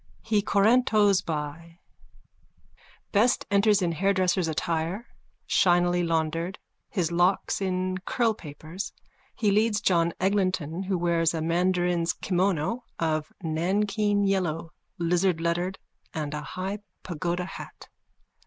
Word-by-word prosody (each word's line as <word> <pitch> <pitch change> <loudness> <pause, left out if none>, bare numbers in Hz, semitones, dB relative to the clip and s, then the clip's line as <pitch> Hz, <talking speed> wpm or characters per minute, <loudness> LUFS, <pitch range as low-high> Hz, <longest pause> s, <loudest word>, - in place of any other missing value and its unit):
_(He 215 -2 +2
corantos 205 -1 +4
by. 160 +2 -5 1.3
Best 225 +4 +3
enters 200 0 +4
in 170 - +1
hairdresser's 185 0 +1
attire, 165 +6 -2 0.4
shinily 175 -1 +3
laundered, 165 +2 -1 0.3
his 175 -5 -1
locks 175 +3 +1
in 185 0 -1
curlpapers. 185 - -3 0.4
He 210 -4 +2
leads 210 +1 +2
John 170 -4 +2
Eglinton 185 -4 0
who 190 -1 -1
wears 170 -1 +1
a 160 - -2
mandarin's 175 0 +1
kimono 190 +4 0
of 155 -2 -1
Nankeen 200 +5 +1
yellow, 170 -4 0 0.3
lizardlettered, 175 +1 +1 0.4
and 150 -2 -3
a 150 - -3
high 185 +7 -4 0.2
pagoda 175 +1 -2
hat.) 190 - -10
180 Hz, 105 wpm, -27 LUFS, 165-200 Hz, 1.3 s, corantos